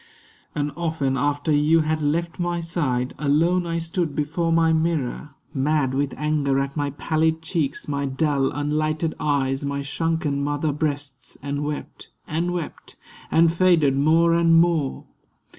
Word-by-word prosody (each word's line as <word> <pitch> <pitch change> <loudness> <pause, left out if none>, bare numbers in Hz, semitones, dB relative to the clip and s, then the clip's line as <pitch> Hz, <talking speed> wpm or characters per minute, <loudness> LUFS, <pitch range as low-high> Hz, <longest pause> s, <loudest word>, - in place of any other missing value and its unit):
And 145 0 -1
often, 160 -6 -1
after 145 +4 0
you 150 +2 +4
had 155 0 -1
left 165 +4 -1
my 175 0 -1
side, 145 -7 -1
Alone 165 +5 +2
I 165 0 -1
stood 165 -2 -2
before 165 +3 -1
my 165 0 +3
mirror, 155 -3 -1 0.2
mad 140 -1 +1
With 140 0 -1
anger 150 -2 +1
at 135 0 -3
my 145 -2 -1
pallid 160 +3 0
cheeks, 155 -4 -2
my 140 -1 -1
dull 135 0 +1
Unlighted 155 +2 -1
eyes, 135 -2 0
my 140 0 -2
shrunken 150 -1 -1
mother 145 +1 -1
breasts, 145 -3 -3
And 145 +1 -2
wept, 150 0 -6 0.2
and 170 +3 -1
wept, 175 -3 -6 0.3
and 165 0 +4
faded 170 -6 +3
more 165 +4 +4
and 165 0 +4
more. 165 -5 +1
150 Hz, 145 wpm, -23 LUFS, 140-165 Hz, 0.3 s, you